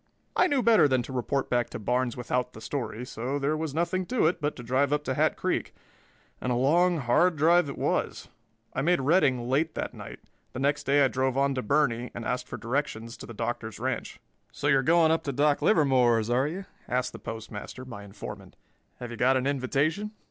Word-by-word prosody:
I - - +4
knew 280 -6 +1
better 220 -10 +6
than 130 -3 +1
to 130 - -8
report 130 +2 -1
back 120 -1 0
to - - -6
Barnes 125 +2 -1
without 125 +1 -2
the - - -10
story, 125 -3 -4
so 125 +3 -3
there 145 +2 0
was 155 -2 -4
nothing 175 +2 0
to 250 -8 +1
it 170 +1 +1
but 150 0 -1
to 120 - -9
drive 130 +4 +1
up 150 0 +1
to 130 - -1
Hat - - +1
Creek, - - -2 0.7
and 125 - -1
a - - +2
long, 170 +8 +3
hard 155 +7 +3
drive 165 +1 +4
it 140 - -6
was. - - -1 0.5
I 135 - -1
made 175 +3 +3
Redding 135 -5 +2
late 150 +5 0
that - - -3
night; - - -9 0.4
the - - -5
next 145 +2 0
day 140 0 +5
I - - +4
drove 130 0 -1
on 140 0 +2
to 130 - -2
Burney 125 -1 +1
and 115 - -5
asked 125 0 -2
for - - -6
directions 115 -2 -3
to - - -10
the 115 - -8
Doctor's 115 -1 -4
ranch. - - -3 0.3
"So - - -7
you're 140 -2 +4
going 160 +3 +4
up 165 - +2
to 140 - -1
Doc 145 +2 +2
Livermore's, 125 - +3
are 130 +3 +2
you?" 185 +5 -5 0.2
asked 125 +1 -1
the - - -8
Postmaster, 115 +3 -7
my 115 -5 -9
informant. 100 -1 -9 0.4
"Have 120 -1 -8
you 120 - -7
got 130 +1 +3
an 130 - -1
invitation?" 145 +9 0
135 Hz, 215 wpm, -27 LUFS, 125-150 Hz, 0.7 s, better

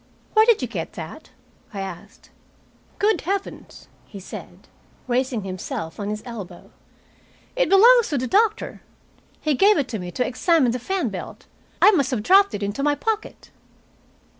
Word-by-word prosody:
"Where 435 +1 +5
did 455 - +4
you - - -1
get 185 -8 -5
that?" 165 - -9 0.5
I 195 - -3
asked. 195 - -10 0.7
"Good 425 +1 +2
heavens!" 390 +3 -5 0.2
he 200 - -10
said, 190 - -11 0.4
raising 250 -3 -1
himself 185 -3 -6
on 205 0 -3
his 210 0 -4
elbow. 230 -7 -9 0.8
"It - - +1
belongs 465 +4 +6
to 290 - -1
the 255 - -1
doctor. 425 - +1 0.6
He 305 - +1
gave 400 +9 +4
it 280 -4 0
to 220 - -4
me 180 -1 -6
to 250 - 0
examine 265 0 +2
the 250 - -3
fan 380 +10 -2
belt. - - -8 0.4
I 420 - +9
must 285 - +1
have 245 -6 -2
dropped 395 - +5
it 205 - -4
into 205 +6 -3
my 290 +1 +2
pocket." 440 +5 -4
265 Hz, 165 wpm, -22 LUFS, -, 0.8 s, I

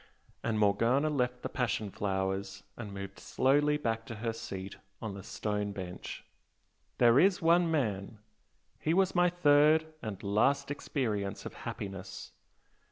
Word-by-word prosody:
And 115 -1 0
Morgana 115 +8 +3
left 125 -3 -1
the - - -1
passion 115 -5 -1
flowers 95 0 -2
and 110 -4 -7
moved 100 0 -7
slowly 145 +3 +2
back 115 -6 -1
to 115 - -6
her 115 +1 -2
seat 95 -3 -7 0.2
on 110 -3 -5
the 100 - -7
stone 105 +1 -3
bench 90 -3 -7 0.7
"There 120 +1 +6
is 190 +2 +4
one 170 +1 +4
man! 110 -9 -1 0.6
He 160 +2 +1
was 190 0 +3
my 180 0 +4
third 155 -2 +5 0.2
and 105 -4 -6
last 135 +8 +2
experience 110 -9 -2
of - - -6
happiness. 100 0 -7
115 Hz, 140 wpm, -31 LUFS, 100-145 Hz, 0.7 s, There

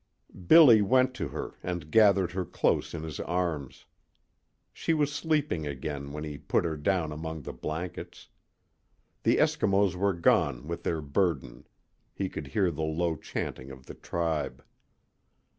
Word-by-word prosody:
Billy 130 - +8
went 130 +5 +3
to - - -4
her - - -7
and 85 -4 -5
gathered 100 -5 +5
her 95 +1 -2
close 90 - 0
in 80 - -5
his 80 -4 -6
arms. 85 -6 -3 0.9
She 165 - 0
was 145 -2 +1
sleeping 150 - -1
again 70 0 -5
when 75 +1 -5
he 75 -2 -6
put - - 0
her 80 -2 -1
down 80 +1 0
among 80 0 -6
the - - -6
blankets. 80 +3 -6 0.9
The - - +3
Eskimos 100 -1 +2
were 100 +2 +1
gone 70 -6 +2
with 85 0 -4
their 80 -2 -2
burden. 75 -3 -1 0.5
He 95 -1 -2
could 75 - -7
hear 95 +4 +1
the 80 0 -5
low 80 +2 0
chanting 65 -2 -5
of 65 -1 -12
the - - -9
tribe. 80 -5 -3
85 Hz, 150 wpm, -28 LUFS, 75-95 Hz, 0.9 s, Billy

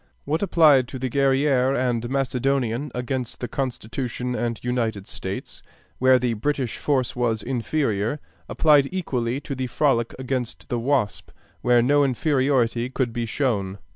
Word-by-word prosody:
What 155 +3 -1
applied 155 -9 +5
to 130 - -7
the 130 -1 -3
Guerrière 135 -1 +2
and 120 -2 -1
Macedonian 135 0 0
against 125 -1 -3
the 125 - -3
Constitution 125 0 -3
and 120 -2 -2
United 115 -5 -1
States, - - -6 0.4
where 130 0 +6
the 125 -1 0
British 130 +1 -2
force 135 -4 0
was 115 -3 0
inferior, 120 -1 -1 0.3
applied 145 -3 +4
equally 130 -9 -2
to 145 - -5
the 130 -1 -3
Frolic 120 -3 +1
against 130 -2 -4
the 120 - -1
Wasp, 115 -7 0 0.3
where 120 -1 +4
no 145 +3 +4
inferiority 130 -3 +1
could 130 -3 -1
be 120 -1 -2
shown. 105 -7 -1
125 Hz, 140 wpm, -24 LUFS, 120-140 Hz, 0.4 s, where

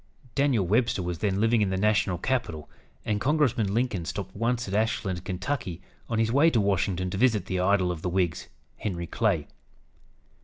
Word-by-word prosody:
Daniel 135 -8 +2
Webster 110 0 +1
was 90 -1 -3
then 100 -2 0
living 115 +1 +3
in 100 - +2
the 95 - -1
national 105 -2 +2
capital, 90 - -2 0.4
and 105 -1 -1
Congressman 130 -8 +2
Lincoln 115 -5 0
stopped 95 +2 -5
once 120 +2 -1
at 95 - -5
Ashland, 100 -4 0
Ky., 95 - -3 0.3
on 115 - -1
his 115 0 +2
way 145 +6 +5
to 120 - +2
Washington 95 -2 0
to 95 - -3
visit 110 -6 +3
the 95 -1 -2
idol 95 -1 +2
of 85 -3 -5
the 90 - -2
Whigs, 90 -2 -1 0.3
Henry 85 -4 -3
Clay. - - 0
100 Hz, 180 wpm, -27 LUFS, 90-115 Hz, 0.4 s, way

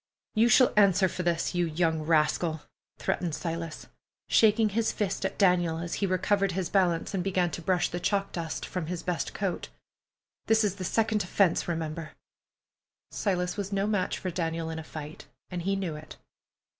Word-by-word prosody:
"You 225 +2 +4
shall 255 +2 +6
answer 200 -2 +5
for 180 - -4
this, 170 -2 0
you 175 -1 +1
young 160 0 0
rascal," 155 0 +1 0.4
threatened 170 -4 -1
Silas, 165 -1 -5 0.4
shaking 220 0 +4
his 225 +2 0
fist 195 -2 -2
at 190 - -3
Daniel, 175 -4 +3
as 170 +1 -4
he 200 - +2
recovered 190 +1 +1
his 185 -1 -2
balance 180 -2 +1
and 185 -2 -1
began 180 -2 +1
to 170 - -5
brush 180 +1 +1
the 175 - -4
chalk 200 +2 0
dust 165 -2 -4
from 180 -4 -4
his 175 -1 -4
best 175 -2 -2
coat. 190 -3 -2 0.8
"This 220 0 +4
is 200 -2 0
the 185 - -5
second 215 +2 +1
offense, 180 -1 +2
remember!" 160 -1 -4 1.0
Silas 180 -3 -1
was 200 -1 -3
no 195 0 +1
match 205 -3 0
for 185 - -4
Daniel 165 -1 -2
in 160 - -4
a - - -6
fight, 155 -1 -9 0.2
and 180 -1 -3
he 195 +3 0
knew 185 -5 -3
it. 150 +1 -10
180 Hz, 180 wpm, -28 LUFS, 165-195 Hz, 1.0 s, shall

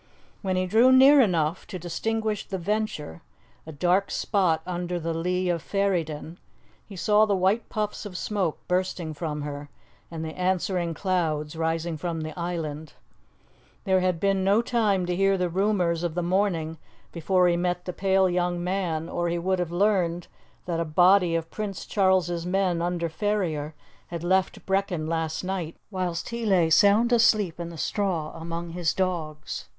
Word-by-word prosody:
When 190 -2 -1
he 185 0 +1
drew 225 +7 +5
near 270 +2 +8
enough 170 -6 0
to 185 - -6
distinguish 215 +5 -2
the 190 - -3
Venture, 190 - -3 0.5
a - - -6
dark 180 +6 +1
spot 175 -7 +1
under 175 0 -3
the 165 0 -2
lee 180 +3 -1
of 170 -2 0
Ferryden, 170 -5 -2 0.5
he 200 - -10
saw 210 +3 +3
the 200 - +2
white 195 +5 +1
puffs 210 -1 -3
of 195 -4 -7
smoke 190 -7 -1
bursting 180 -3 -1
from 150 -1 -4
her, 145 0 -6 0.4
and 160 -1 -5
the 160 - -5
answering 180 -2 -1
clouds 160 -4 -1
rising 165 0 -1
from 165 +1 -3
the 155 0 -5
island. 160 -3 -4 0.9
There 190 -2 +3
had 180 -2 0
been 195 0 +1
no 200 +4 +3
time 215 -6 +1
to 180 0 -1
hear 195 +1 +3
the 180 -1 0
rumours 180 -3 +1
of 170 -2 -2
the 175 - -1
morning 170 -4 0 0.3
before 180 +2 +2
he 175 - +3
met 180 0 -1
the 180 - -4
pale 190 0 +2
young 175 -1 -1
man, 175 -4 -2
or 175 0 -2
he 170 - -1
would 185 +2 0
have 175 -2 -2
learned 175 -2 +1 0.4
that 170 -2 -2
a - - +1
body 175 +2 +4
of 165 0 -3
Prince 205 -3 -5
Charles's 185 -4 +1
men 180 -1 0
under 175 -1 -1
Ferrier 160 -5 -2 0.3
had 170 -1 -6
left 185 +1 0
Brechin 190 -4 0
last 160 0 -2
night 180 -3 -3 0.2
whilst 180 -3 -3
he 235 0 -4
lay 180 -6 +3
sound 205 +8 +5
asleep 215 -7 +3
in 170 -1 -4
the 170 - -9
straw 175 -5 -1
among 165 +1 -5
his 170 -2 -1
dogs. 160 -5 -3
180 Hz, 170 wpm, -26 LUFS, 165-195 Hz, 0.9 s, near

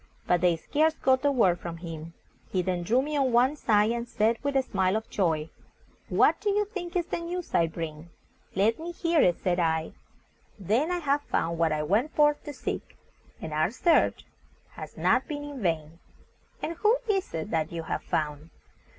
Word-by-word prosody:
But 175 -1 +2
they 175 -2 +4
scarce 310 - +1
got 260 -2 +2
a 285 - +4
word 185 -10 +3
from 170 -1 -6
him. 165 -1 -8 0.4
He 185 -2 +1
then 180 -1 -1
drew 240 +9 +2
me 300 +1 -3
on 270 -2 +2
one 250 +5 +4
side, 215 -5 +2
and 235 0 -3
said, 225 +1 +1
with 280 -1 0
a 265 - +3
smile 190 -5 0
of 220 0 -2
joy, 160 -5 0 0.6
"What - - +3
do 415 - 0
you 415 +1 +2
think 375 -4 -7
is 350 -2 +1
the - - -3
news 345 +1 -5
I 165 - +4
bring?" 160 0 -6 0.5
"Let 210 +7 +2
me 340 +2 -6
hear 335 -2 +2
it," 175 - +3
said 180 -1 +1
I. 160 -1 0 0.7
"Then 220 - +1
I 360 - 0
have 290 -3 +1
found 170 - -1
what 165 -1 +3
I 155 0 0
went 215 - 0
forth 295 -1 +3
to 295 - -5
seek, - - -5 0.4
and 155 - -6
our 155 +2 +2
search 325 - +2 0.5
has - - -10
not - - +2
been 290 -2 -4
in 290 -3 -7
vain." 165 -3 -2 0.6
"And 330 +1 -3
who 435 +6 +3
is 390 -3 0
it 160 - -4
that 160 -1 0
you 165 -1 -4
have - - -3
found?" 150 0 -3
220 Hz, 200 wpm, -27 LUFS, -, 0.7 s, they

